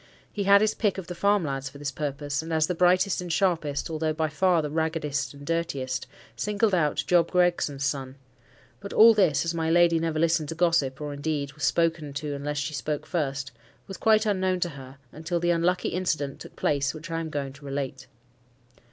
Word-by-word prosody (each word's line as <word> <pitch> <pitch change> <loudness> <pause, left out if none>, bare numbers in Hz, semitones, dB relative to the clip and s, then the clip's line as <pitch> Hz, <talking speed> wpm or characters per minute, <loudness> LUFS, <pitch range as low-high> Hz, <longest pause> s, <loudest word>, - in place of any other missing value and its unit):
He 200 -2 -2
had 200 +1 +6
his 215 0 +2
pick 205 -4 0
of 190 - -5
the 180 - -6
farm 200 +1 +2
lads 135 -1 -3
for 140 - -13
this 140 0 -4
purpose; 145 0 -3
and, 165 +1 -7
as 160 -1 +3
the 180 - -2
brightest 180 +2 +3
and 175 -1 -5
sharpest, 160 -4 0
although 155 -1 -1
by 155 0 -1
far 170 +2 +2
the 150 - -4
raggedest 155 -3 -2
and 140 0 -11
dirtiest, 140 -6 -2 0.3
singled 210 0 0
out 155 -5 +1
Job 170 -2 +3
Gregson's 175 -6 +1
son. 135 -1 -3 0.6
But 200 0 -8
all 225 +1 +8
this—as 170 -5 +2
my 160 -1 -1
lady 170 0 +4
never 165 -1 -1
listened 160 -2 +1
to 165 - -4
gossip, 160 -6 +1
or 145 -1 -4
indeed, 145 -1 -3
was 150 - -3
spoken 165 -3 0
to 145 +1 -4
unless 145 +1 -4
she 145 +2 -2
spoke 150 0 -3
first—was 135 -2 -5
quite 220 0 +3
unknown 190 -3 +1
to 175 - +1
her, 135 -3 -11
until 160 +3 -3
the 175 +1 +1
unlucky 175 +2 +1
incident 155 -6 -2
took - - -11
place 140 0 0
which 160 +2 -9
I 165 - -1
am 165 -1 -4
going 140 -3 -4
to 140 +1 -16
relate. 135 -1 -4
160 Hz, 200 wpm, -26 LUFS, 145-175 Hz, 0.6 s, all